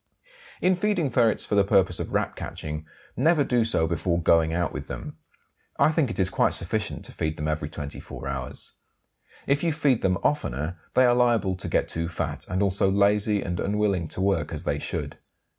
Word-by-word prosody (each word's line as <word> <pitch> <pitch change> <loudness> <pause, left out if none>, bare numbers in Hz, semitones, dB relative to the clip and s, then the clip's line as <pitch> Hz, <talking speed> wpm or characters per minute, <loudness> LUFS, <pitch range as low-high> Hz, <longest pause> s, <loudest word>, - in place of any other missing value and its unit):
In 185 +1 +4
feeding 180 -7 0
ferrets 115 -2 +2
for - - -4
the 100 -1 +5
purpose 95 -3 +2
of - - -4
Rat - - -1
catching, 75 0 -6 0.3
never 155 +3 +3
do 125 -3 +2
so 110 -8 +2
before 85 +1 0
going 80 -1 +3
out 85 0 -1
with - - -6
them; - - -7 0.6
I - - +4
think 155 -5 +1
it 115 - -4
is 95 -1 +2
quite - - +3
sufficient 105 +5 -2
to - - -8
feed 80 0 -3
them 75 - -3
every 75 -1 -2
24 70 -2 -7
hours. 65 -2 -5 0.7
If 140 +2 +1
you 170 - +2
feed 145 -6 +2
them 95 -1 +2
oftener 75 +7 -1 0.2
they 130 - +6
are 120 - +5
liable 120 -6 +2
to 90 - -5
get - - +1
too 85 0 -2
fat, 85 - -4
and 95 +2 0
also 95 0 +2
lazy 100 +1 +2
and 90 0 -3
unwilling 100 -4 0
to 90 - -5
work 95 0 +1
as - - -4
they - - -1
should. - - -4
95 Hz, 195 wpm, -26 LUFS, 85-120 Hz, 0.7 s, they